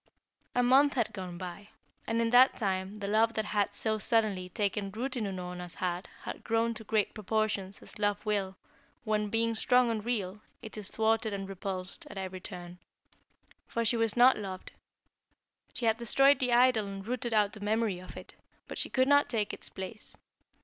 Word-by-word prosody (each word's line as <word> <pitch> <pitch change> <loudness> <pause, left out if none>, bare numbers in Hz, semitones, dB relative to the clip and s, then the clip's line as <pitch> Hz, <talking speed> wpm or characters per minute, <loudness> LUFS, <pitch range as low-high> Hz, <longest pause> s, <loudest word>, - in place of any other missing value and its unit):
A 245 - +3
month 270 +3 +5
had 235 -4 0
gone 180 -3 -6
by, 185 +3 -8 0.4
and 230 0 0
in 230 0 +1
that 250 +2 +6
time 190 -1 -2
the 200 -1 -4
love 220 +2 +3
that 220 - -1
had 205 -1 0
so 220 -1 0
suddenly 210 -5 +1
taken 200 -1 -1
root 245 +7 -4
in 230 -4 -1
Unorna's 180 -2 -6
heart 180 +1 -2 0.2
had - - -6
grown 230 +1 +1
to 220 - -9
great 215 -1 0
proportions 210 -2 -2
as - - -10
love 205 0 0
will 200 -3 -1 0.5
when, 210 -2 0
being 230 +1 +1
strong 245 +2 +3
and 215 -2 -2
real, 210 -4 -2 0.2
it 220 - -8
is 210 -2 -2
thwarted 220 -1 +1
and 195 -1 -4
repulsed 195 - -5
at - - -9
every 190 -1 -5
turn. 175 0 -8 0.9
For 230 0 -1
she 230 - +2
was 225 -1 +1
not 250 -1 +6
loved. 190 -3 -6 1.0
She 240 - -2
had 225 0 +3
destroyed 275 +4 +4
the 250 -3 +1
idol 240 -3 +4
and 195 -1 -7
rooted 245 0 -2
out 205 -1 +3
the 215 - -9
memory 210 -2 0
of 185 - -11
it, - - -10 0.3
but - - -5
she - - +2
could 260 0 +2
not 285 0 +5
take 215 -4 -1
its - - -7
place. 190 +3 -7
215 Hz, 190 wpm, -30 LUFS, 195-230 Hz, 1.0 s, that